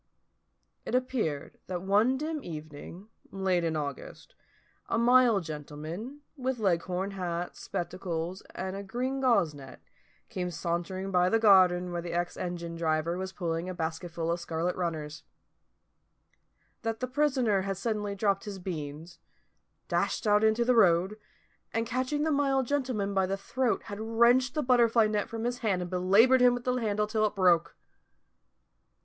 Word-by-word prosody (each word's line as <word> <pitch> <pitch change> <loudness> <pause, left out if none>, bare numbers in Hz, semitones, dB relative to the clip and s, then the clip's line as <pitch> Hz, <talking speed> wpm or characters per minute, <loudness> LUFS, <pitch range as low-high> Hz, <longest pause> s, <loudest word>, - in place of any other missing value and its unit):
It - - -2
appeared 245 - -2
that 180 -1 -4
one 210 +7 +3
dim 305 +1 -3
evening, 155 +5 -9 0.2
late 190 -3 0
in 165 -1 0
August, 145 -3 -6 0.6
a - - +1
mild 240 -4 +5
gentleman, 155 - -7
with 260 -2 -2
Leghorn 185 -1 0
hat, 175 -2 -4
spectacles, 175 0 -4
and 190 0 -4
a 200 - -5
green 250 +7 -3
gauze 200 - +3
net, 135 -3 -11 0.5
came 180 -1 -3
sauntering 180 +3 -3
by 180 -1 +3
the 225 - +3
garden 185 -4 +5
where 175 0 -2
the 170 0 -6
ex 175 0 -1
engine 175 -2 -4
driver 160 0 0
was 190 +1 -4
pulling 170 -1 -3
a 185 - -5
basketful 165 0 -3
of 170 - -1
scarlet 170 +1 -2
runners: 155 -4 -4 1.6
that 225 -1 -3
the 255 - -1
prisoner 255 -7 +1
had 195 0 -3
suddenly 210 -1 -2
dropped 200 -1 0
his 205 -2 -6
beans, 165 -2 -6 0.7
dashed - - -1
out 210 0 +4
into 220 +2 +3
the 250 - +4
road, 190 -2 +4 0.6
and 225 +1 -1
catching 255 +5 -1
the 315 - +1
mild 275 -2 +2
gentleman 245 -7 -1
by 190 -1 +2
the 195 +1 -2
throat 245 +5 -1
had 205 0 -7
wrenched 235 +4 +3
the 300 - 0
butterfly 235 -3 +4
net 210 -1 -1
from 225 -1 -5
his 245 +1 -2
hand 210 -6 0
and 180 0 -5
belaboured 200 +8 +5
him 245 -1 +6
with 245 - -6
the 250 - 0
handle 210 -3 0
till 215 0 0
it 210 - -7
broke. 180 -4 +3
195 Hz, 155 wpm, -29 LUFS, 175-235 Hz, 1.6 s, him